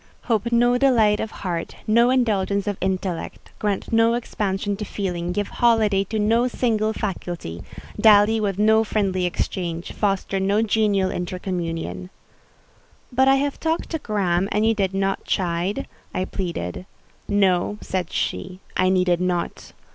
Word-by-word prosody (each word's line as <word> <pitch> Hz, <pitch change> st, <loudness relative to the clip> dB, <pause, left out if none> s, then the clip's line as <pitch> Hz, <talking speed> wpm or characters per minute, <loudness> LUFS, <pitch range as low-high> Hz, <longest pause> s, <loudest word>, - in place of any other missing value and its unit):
Hope 230 Hz, 0 st, 0 dB
no 240 Hz, +1 st, +3 dB
delight 225 Hz, -6 st, +4 dB
of 220 Hz, -, -2 dB
heart—no 215 Hz, +6 st, 0 dB
indulgence 205 Hz, -6 st, +1 dB
of 205 Hz, -1 st, -1 dB
intellect: 185 Hz, -2 st, -3 dB
grant 205 Hz, +1 st, -2 dB
no 225 Hz, +1 st, +4 dB
expansion 205 Hz, -4 st, -2 dB
to 210 Hz, -, -4 dB
feeling—give 185 Hz, -1 st, -3 dB
holiday 220 Hz, -5 st, +3 dB
to 220 Hz, +3 st, -3 dB
no 225 Hz, +4 st, +2 dB
single 220 Hz, -3 st, 0 dB
faculty: 175 Hz, -, -5 dB, 0.4 s
dally 215 Hz, +1 st, +6 dB
with 200 Hz, -3 st, -1 dB
no 220 Hz, +1 st, +4 dB
friendly 195 Hz, -4 st, 0 dB
exchange: 175 Hz, -1 st, -3 dB
foster 195 Hz, -1 st, -1 dB
no 200 Hz, +3 st, +2 dB
genial 205 Hz, -3 st, +2 dB
intercommunion…." 170 Hz, -, -4 dB, 1.0 s
"But 260 Hz, +2 st, +3 dB
I 270 Hz, -, +6 dB
have 280 Hz, +1 st, -1 dB
talked 325 Hz, 0 st, -1 dB
to 320 Hz, -, -2 dB
Graham 195 Hz, -6 st, 0 dB
and 210 Hz, +1 st, +2 dB
you 225 Hz, -, +4 dB
did 195 Hz, -3 st, -1 dB
not 195 Hz, 0 st, 0 dB
chide," 180 Hz, +1 st, -1 dB, 0.3 s
I 185 Hz, -, 0 dB
pleaded. 175 Hz, -, -4 dB, 0.4 s
"No," 200 Hz, -1 st, +2 dB
said 185 Hz, -2 st, -3 dB
she, 185 Hz, 0 st, -3 dB, 0.2 s
"I 185 Hz, 0 st, +3 dB
needed 180 Hz, -2 st, +2 dB
not. 180 Hz, -1 st, -2 dB
200 Hz, 140 wpm, -23 LUFS, 185-220 Hz, 1.0 s, dally